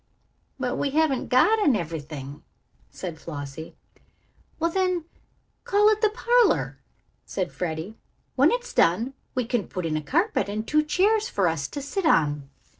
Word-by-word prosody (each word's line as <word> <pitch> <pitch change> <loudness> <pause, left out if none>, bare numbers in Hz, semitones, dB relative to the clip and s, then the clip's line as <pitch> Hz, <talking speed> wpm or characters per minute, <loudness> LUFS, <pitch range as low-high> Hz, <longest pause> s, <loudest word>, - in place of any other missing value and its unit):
"But - - -2
we 285 - 0
haven't 295 -2 +1
got 425 - +4
an 280 - +4
ev'rything," 150 -5 -5 0.5
said 170 -4 -7
Flossie. 145 0 -7 0.8
"Well, 335 +1 +1
then, 365 -2 0 0.6
call 415 +1 +4
it 430 0 +1
the 430 - +4
parlor," 475 +2 +2 0.4
said 185 -2 -3
Freddie. 175 +5 -5 0.4
"When - - +5
it's 485 0 -2
done 225 +11 +2 0.2
we 250 -2 0
can 235 -3 -1
put 180 -2 -4
in 155 -1 -1
a 155 - -1
carpet 345 - 0
and 215 +2 -4
two 305 0 +3
chairs 400 +8 +2
for 195 -3 +1
us 160 -4 -1
to 285 - -6
sit 360 +4 -1
on." 145 - +2
245 Hz, 155 wpm, -25 LUFS, -, 0.8 s, When